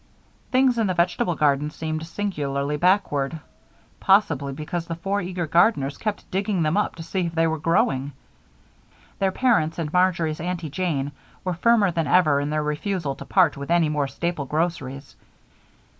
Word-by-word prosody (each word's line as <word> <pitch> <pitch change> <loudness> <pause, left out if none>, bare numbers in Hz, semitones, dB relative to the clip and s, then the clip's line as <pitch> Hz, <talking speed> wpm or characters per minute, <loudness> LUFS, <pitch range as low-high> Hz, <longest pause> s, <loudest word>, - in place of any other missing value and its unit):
Things 255 -2 +3
in 220 - +2
the 185 - -1
vegetable 175 0 +1
garden 145 -1 +2
seemed 155 +1 -4
singularly 150 -7 -2
backward, 160 -4 +1 0.6
possibly 160 -9 +3
because 160 +4 -5
the 165 - -3
four 195 +4 -2
eager 180 -1 -3
gardeners 150 -4 +2
kept 215 -2 -4
digging 195 -2 0
them 155 +3 +1
up 210 - 0
to 165 - -8
see 175 +1 -2
if 165 - -7
they 165 0 +3
were 160 -1 -1
growing. 145 -4 +1 1.1
Their 195 -1 +2
parents 190 -9 +1
and 155 -3 -4
Marjory's 170 -4 +1
Aunty 175 -3 -4
Jane 150 -5 -1 0.3
were 185 - -1
firmer 205 +2 +3
than 165 -2 -1
ever 150 -2 +4
in 145 +1 -2
their 155 0 0
refusal 150 0 -2
to - - -9
part 175 -7 +3
with 140 +2 -7
any 170 -2 +3
more 145 -2 0
staple 155 +2 -3
groceries. 145 -3 -3
165 Hz, 165 wpm, -24 LUFS, 150-185 Hz, 1.1 s, ever